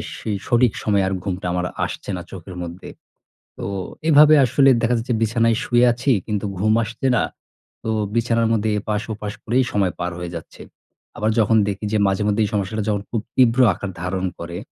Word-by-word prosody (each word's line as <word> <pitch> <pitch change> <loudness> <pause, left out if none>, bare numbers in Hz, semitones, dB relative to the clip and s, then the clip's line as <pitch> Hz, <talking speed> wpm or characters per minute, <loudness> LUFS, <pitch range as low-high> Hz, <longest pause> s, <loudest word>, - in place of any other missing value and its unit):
সে - - -7 0.2
সঠিক 120 -1 +3
সময়ে 100 -2 +2
আর 95 - -1
ঘুমটা 95 -2 -4
আমার 90 0 -1 0.2
আসছে - - -7
না 90 - -5
চোখের 90 0 -9
মধ্যে। 85 +1 -7 0.7
তো - - -7 0.5
এভাবে 150 +1 +7
আসলে 135 +3 +4
দেখা 120 +1 +2
যাচ্ছে 115 +2 -2
বিছানায় 115 0 +2
শুয়ে 120 0 +3
আছি 120 +4 0
কিন্তু 105 -2 -2
ঘুম 110 +2 +3
আসছে 120 +4 -3
না। - - +2 0.6
তো - - -3 0.3
বিছানার 115 0 +2
মধ্যে 110 0 0
এপাশ-ওপাশ 105 0 -4
করেই 125 +4 +2
সময় 100 -3 +1
পার 90 +1 -2
হয়ে 90 -1 -5
যাচ্ছে। 85 - -9 0.6
আবার 110 +1 0
যখন 110 +1 +4
দেখি 100 +1 -3
যে - - +3
মাঝেমধ্যেই 105 +2 +1
এই 105 - -3
সমস্যাটা 105 +1 -1
যখন 100 -1 0
খুব 115 -3 -2
তীব্র 125 -1 +4
আকার 100 +3 -6
ধারণ 90 +1 -2
করে, 85 +1 -6
105 Hz, 180 wpm, -21 LUFS, 95-115 Hz, 0.7 s, এভাবে